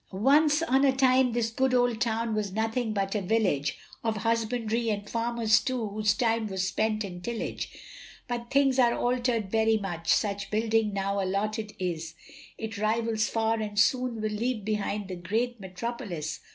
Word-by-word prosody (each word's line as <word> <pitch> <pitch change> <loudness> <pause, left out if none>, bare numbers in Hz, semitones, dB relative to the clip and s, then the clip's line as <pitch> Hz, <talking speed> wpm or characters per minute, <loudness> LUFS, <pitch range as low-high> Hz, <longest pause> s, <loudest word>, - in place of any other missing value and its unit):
Once 295 - +4
on 270 -4 +3
a 275 - +5
time 260 -1 +3
this 230 -1 0
good 260 +2 +1
old 245 -2 +2
town 230 -1 0
was 210 -3 -2
nothing 225 +2 -1
but 195 -2 -1
a 210 - 0
village, 180 -9 +1 0.3
Of 225 -1 0
husbandry, 230 +1 0
and 205 -1 -2
farmers 230 -1 +2
too, 245 -5 -2
whose 210 0 +1
time 225 -1 +1
was 190 -2 -1
spent 215 +2 0
in 180 -3 -7
tillage; 235 +4 -4 0.6
But 240 -1 -4
things 270 -1 +3
are 240 -2 +4
altered 245 -5 0
very 220 0 +3
much, 175 -5 -2
such 200 -1 0
building 220 0 +1
now 200 0 -1
allotted 210 +3 -2
is, 165 -3 -3 0.4
It 220 -1 -5
rivals 220 0 +1
far 225 0 +1
and 210 -1 -4
soon 245 +2 +2
will 215 0 -1
leave 220 0 -2
behind 210 -1 -2
the 185 - -5
great 225 +7 -1
Metropolis. 190 - -5
220 Hz, 165 wpm, -28 LUFS, 205-235 Hz, 0.6 s, a